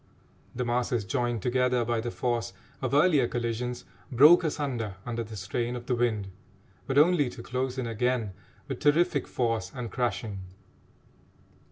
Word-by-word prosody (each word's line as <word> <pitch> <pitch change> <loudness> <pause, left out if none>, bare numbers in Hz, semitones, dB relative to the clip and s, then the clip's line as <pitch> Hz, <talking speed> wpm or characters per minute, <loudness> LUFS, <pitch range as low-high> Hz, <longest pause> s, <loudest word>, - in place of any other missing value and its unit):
The 125 +1 -2
masses 120 -2 0
joined 120 +2 -1
together 125 -1 +1
by 115 -1 0
the 120 - -3
force 120 -1 -2 0.3
of 130 -2 -1
earlier 145 -5 +4
collisions 120 +1 -3 0.3
broke 150 +8 +7
asunder 130 - -2
under 115 -1 -3
the 110 -1 -9
strain 120 +6 -2
of 120 0 -7
the 125 - 0
wind, 115 -5 0 0.6
but 135 +1 -1
only 150 -3 +5
to 120 -1 -10
close 130 +1 -2
in 130 - -2
again 115 -2 -1 0.3
with - - -4
terrific 150 0 +2
force 115 -6 -1
and 120 -4 -5
crashing. 115 -4 -2
120 Hz, 150 wpm, -28 LUFS, 115-130 Hz, 0.6 s, broke